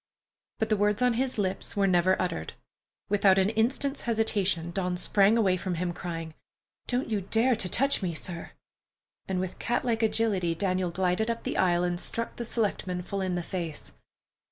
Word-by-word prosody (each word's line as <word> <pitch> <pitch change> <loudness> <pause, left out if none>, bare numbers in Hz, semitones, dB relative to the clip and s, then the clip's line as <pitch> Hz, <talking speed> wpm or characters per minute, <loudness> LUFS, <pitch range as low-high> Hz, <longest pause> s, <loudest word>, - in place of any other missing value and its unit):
But 220 - -1
the 215 - +3
words 210 +3 +2
on 250 -1 +4
his 255 +1 -1
lips 195 -2 -2
were 200 -1 +2
never 185 0 +3
uttered. 125 - -2 0.5
Without 195 -1 +4
an 195 +2 +3
instant's 260 +6 0
hesitation, 205 -7 0
Dawn 180 -1 -1
sprang 200 +4 +4
away 190 -5 +3
from 180 0 -3
him, 175 +1 -2
crying, 165 -2 -5 0.5
"Don't 250 +1 0
you 210 -2 0
dare 230 +6 +2
to 185 - 0
touch 275 +4 +3
me, 175 -4 -2
sir!" 170 +1 -4 0.7
and 190 -1 -1
with 185 -1 -4
catlike 235 -1 0
agility 210 -6 +1
Daniel 185 0 0
glided 185 +5 0
up 230 0 -2
the - - -3
aisle 175 -1 +2
and 175 -1 -1
struck 230 +5 -3
the 235 - -3
selectman 190 -6 -1
full 195 +2 -3
in 185 -1 -1
the 175 - -2
face. 165 -4 -5
190 Hz, 180 wpm, -28 LUFS, 180-225 Hz, 0.7 s, on